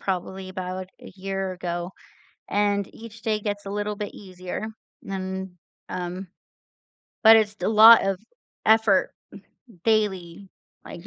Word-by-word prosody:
probably 190 0 -3
about 185 0 -5
a - - -11
year 195 0 -3
ago, 175 0 -4 0.6
and 200 -1 0
each 230 0 -12
day 215 -1 0
gets 205 -1 -4
a - - -4
little 205 0 -2
bit 205 0 -5
easier. 185 +2 -6 0.4
And, 190 -1 -5 0.3
um, 180 +1 -5 1.0
but 225 0 +10
it's 215 -2 +2
st 210 - -11
a - - +2
lot 225 +1 +9
of 195 -1 0 0.5
effort, 220 -3 +4 0.7
daily, 195 -4 0 0.4
like, 175 +3 -10
195 Hz, 130 wpm, -25 LUFS, 185-210 Hz, 1.0 s, but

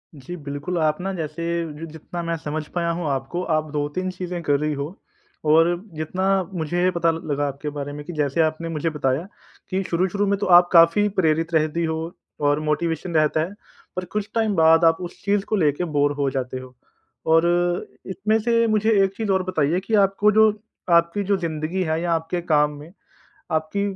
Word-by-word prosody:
जी, 145 +5 -8
बिल्कुल 145 +4 -4
आप 155 -1 +1
ना 195 +1 -2
जैसे 160 -2 -5 0.4
ज 165 - -5
जितना 160 +2 -7
मैं 170 0 -1
समझ 155 0 -4
पाया 170 -1 0
हूँ 175 -3 -3
आपको 135 +6 -3
आप 155 0 -1
दो-तीन 150 +5 -2
चीजें 180 -1 -5
कर 145 -2 +2
रही 150 0 -1
हो। 140 0 -3 0.6
और 160 +2 +6 0.3
जितना 155 +5 -2 0.3
मुझे 175 +2 0
पता 170 -1 +2
ल 165 - -4
लगा 145 0 0
आपके 140 +2 -5
बारे 145 -1 -5
में 150 0 -7
कि 175 - -7
जैसे 150 0 0
आपने 160 +1 -1
मुझे 165 0 -1
बताया 150 +2 -1 0.4
कि 190 0 0
शुरू-शुरू 185 +4 0
में 200 0 +1
तो - - -1
आप 175 0 +4
काफ़ी 170 +5 +6
प्रेरित 165 0 +1
रहती 155 +1 +1
हो 160 -1 -1 0.5
और 145 +1 +2
मोटिवेशन 160 +3 -2
रहता 155 0 +3
है 175 +5 -3 0.4
पर 185 - -3
कुछ 210 -1 -2
टाइम 220 -3 +1
बाद 160 0 +5
आप 165 0 +5
उस 175 - -8
चीज 200 0 +2
को 215 - -1
लेके 155 -3 +1
बोरे 145 0 +3
हो 140 -1 +1
जाते 130 -1 -3
हो 130 0 -12 0.6
और 165 +1 +5 0.6
इसमें 205 +3 0
से 230 +1 +2
मुझे 215 0 +2
एक 195 0 0
चीज़ 220 -3 -1
और 190 -1 +2
बताइए 175 -2 0
कि 200 +4 -6
आपको 200 +2 +2
जो 220 +1 +6 0.5
आपकी 170 +4 +2
जो 200 0 +1
जिंदगी 165 +1 -3
है 160 -1 -1
या 175 0 -1
आपके 165 +2 -2
काम 150 -3 +2
में। 155 +3 -12 0.6
आपकी 160 +5 -1
165 Hz, 195 wpm, -23 LUFS, 150-185 Hz, 0.6 s, और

